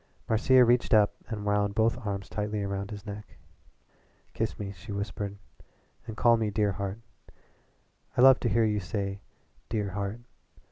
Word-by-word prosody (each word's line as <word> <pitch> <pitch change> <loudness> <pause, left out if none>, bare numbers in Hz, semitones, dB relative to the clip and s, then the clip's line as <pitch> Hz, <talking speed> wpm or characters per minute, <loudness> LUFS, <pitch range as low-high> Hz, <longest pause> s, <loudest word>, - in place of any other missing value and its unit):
Marcia 125 +3 +5
reached 120 -1 +3
up 105 -1 +4
and 105 -3 -5
wound 105 -1 +1
both 115 +1 +3
arms 100 -2 -3
tightly 105 0 -3
round 100 0 -3
his 105 -1 -8
neck. 105 0 -9 1.0
"Kiss - - -2
me," 100 -1 -5
she 100 +3 -10
whispered, 100 0 -4 0.7
"and 110 -1 -7
call 120 -1 +5
me 110 -1 0
'dear 105 0 +1
heart.' 100 +3 -4 1.2
I - - +4
love 130 0 +8
to 120 - 0
hear 115 0 +3
you 105 -1 +1
say 100 +1 -4 0.5
'dear 105 -3 -1
heart.' 100 +4 -4
105 Hz, 155 wpm, -28 LUFS, 100-110 Hz, 1.2 s, love